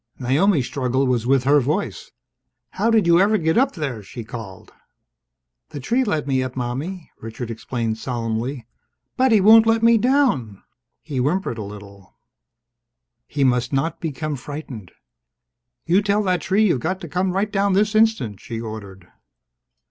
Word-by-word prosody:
Naomi's 140 Hz, -, +2 dB
struggle 130 Hz, 0 st, -1 dB
was 120 Hz, -2 st, 0 dB
with 135 Hz, -1 st, +3 dB
her 145 Hz, +2 st, +4 dB
voice. 150 Hz, +10 st, -2 dB, 0.6 s
"How 230 Hz, -, 0 dB
did 220 Hz, -4 st, +3 dB
you 170 Hz, 0 st, +5 dB
ever 210 Hz, +3 st, +3 dB
get 160 Hz, -3 st, 0 dB
up 265 Hz, +3 st, +2 dB
there?" 140 Hz, -, -4 dB
she 115 Hz, +4 st, -9 dB
called. 110 Hz, -4 st, -10 dB, 1.0 s
"The 150 Hz, -2 st, -7 dB
tree 235 Hz, -, 0 dB
let 160 Hz, -, -1 dB
me 135 Hz, -2 st, 0 dB
up, 130 Hz, -1 st, -4 dB
Mommie," 135 Hz, +9 st, -5 dB
Richard 115 Hz, +1 st, -7 dB
explained 115 Hz, -1 st, -3 dB
solemnly, 120 Hz, +1 st, -3 dB, 0.5 s
"but 260 Hz, -1 st, +2 dB
he 220 Hz, -, +5 dB
won't 220 Hz, +3 st, +7 dB
let 225 Hz, 0 st, +2 dB
me 230 Hz, -1 st, +5 dB
down!" 240 Hz, -, +1 dB, 0.4 s
He 150 Hz, -3 st, -6 dB
whimpered 145 Hz, -3 st, -1 dB
a -, -, -4 dB
little. 100 Hz, -1 st, -12 dB, 1.1 s
He 140 Hz, -1 st, -1 dB
must 125 Hz, -1 st, +1 dB
not 135 Hz, +5 st, -1 dB
become 155 Hz, -1 st, -3 dB
frightened! 125 Hz, -, -8 dB, 0.9 s
"You 180 Hz, +4 st, +3 dB
tell 205 Hz, +1 st, +1 dB
that 180 Hz, -3 st, 0 dB
tree 195 Hz, +7 st, +2 dB
you've 170 Hz, -10 st, +2 dB
got 185 Hz, +8 st, -2 dB
to 170 Hz, -, -7 dB
come 180 Hz, +4 st, -1 dB
right 200 Hz, +2 st, -1 dB
down 200 Hz, -1 st, +1 dB
this 210 Hz, +3 st, +2 dB
instant!" 215 Hz, -, +2 dB
she 115 Hz, -, -6 dB
ordered. 100 Hz, -5 st, -8 dB
145 Hz, 160 wpm, -21 LUFS, 120-195 Hz, 1.1 s, won't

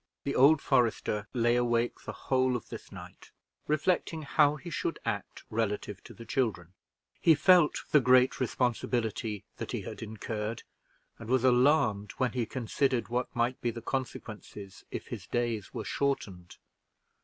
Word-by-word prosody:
The 140 Hz, -, -2 dB
old 140 Hz, +3 st, +5 dB
forester 105 Hz, -3 st, +1 dB
lay 120 Hz, -1 st, +2 dB
awake 120 Hz, -1 st, 0 dB
the -, -, -4 dB
whole 130 Hz, -1 st, +1 dB
of 120 Hz, -, -5 dB
this -, -, -9 dB
night, -, -, -11 dB, 0.4 s
reflecting 155 Hz, +1 st, 0 dB
how 145 Hz, 0 st, +3 dB
he 170 Hz, +4 st, -9 dB
should -, -, -2 dB
act -, -, -4 dB
relative 105 Hz, -2 st, -2 dB
to 115 Hz, -, -12 dB
the 115 Hz, -, -11 dB
children; 105 Hz, -8 st, -1 dB, 0.5 s
he 165 Hz, -, +6 dB
felt 175 Hz, 0 st, +4 dB
the 150 Hz, -, +7 dB
great 130 Hz, 0 st, +4 dB
responsibility 115 Hz, -4 st, -1 dB
that -, -, -5 dB
he -, -, -2 dB
had -, -, -8 dB
incurred, 110 Hz, 0 st, -4 dB, 0.6 s
and 115 Hz, -1 st, -9 dB
was 130 Hz, -1 st, +2 dB
alarmed 125 Hz, -5 st, +3 dB
when 130 Hz, -1 st, 0 dB
he 120 Hz, -3 st, -2 dB
considered 130 Hz, +1 st, -1 dB
what 125 Hz, +1 st, -2 dB
might 120 Hz, +2 st, 0 dB
be 120 Hz, -, 0 dB
the 115 Hz, 0 st, -5 dB
consequences 105 Hz, -6 st, -6 dB
if -, -, -6 dB
his -, -, -7 dB
days 120 Hz, -4 st, -2 dB
were -, -, -5 dB
shortened. 100 Hz, -11 st, -2 dB
120 Hz, 155 wpm, -30 LUFS, 110-135 Hz, 0.6 s, the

